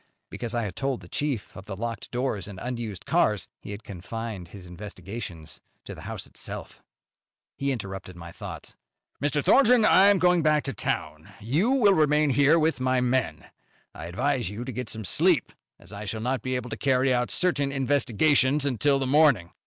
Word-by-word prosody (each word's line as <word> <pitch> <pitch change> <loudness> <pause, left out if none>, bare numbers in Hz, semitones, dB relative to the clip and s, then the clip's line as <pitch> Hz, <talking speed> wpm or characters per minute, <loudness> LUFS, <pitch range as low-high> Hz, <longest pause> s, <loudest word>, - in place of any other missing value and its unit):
Because 120 -1 -5
I 120 - 0
had 100 -4 -5
told 135 -2 -2
the - - -13
chief 140 -9 -3
of 95 - -10
the 100 - -5
locked 115 +1 -5
doors 125 -5 -2
and 100 -3 -9
unused 115 -6 -5
cars, - - +1
he - - -11
had 100 +1 -7
confined 100 0 -6
his 90 +1 -12
investigations 90 -2 -8 0.2
to - - -7
the - - -11
house - - -6
itself. - - -8 0.7
He 140 0 -1
interrupted 95 -6 -5
my 85 -1 -10
thoughts. - - -9 0.5
"Mr. 145 0 0
Thornton, 250 -4 +5
I 195 +2 +6
am 205 -1 +5
going 180 -1 +3
back 150 -1 +3
to 135 - -3
town. - - -3
You 145 - +1
will 245 -7 +5
remain 150 -3 +3
here 145 +4 +4
with 160 -4 +1
my 130 0 +2
men. 125 0 0 0.5
I 80 - -8
advise 120 +6 -1
you 110 +4 -6
to 130 - -4
get 125 0 -5
some 110 -2 -5
sleep, - - +2 0.2
as - - -14
I 100 +1 -6
shall 110 +2 -4
not 130 +3 -1
be 130 0 -2
able 125 -1 -4
to - - -3
carry 130 -1 +2
out 125 0 0
certain 145 -6 +1
investigations 135 +1 +2
until 140 +1 +2
the 135 - -1
morning. 130 - +4
125 Hz, 190 wpm, -26 LUFS, 105-145 Hz, 0.7 s, I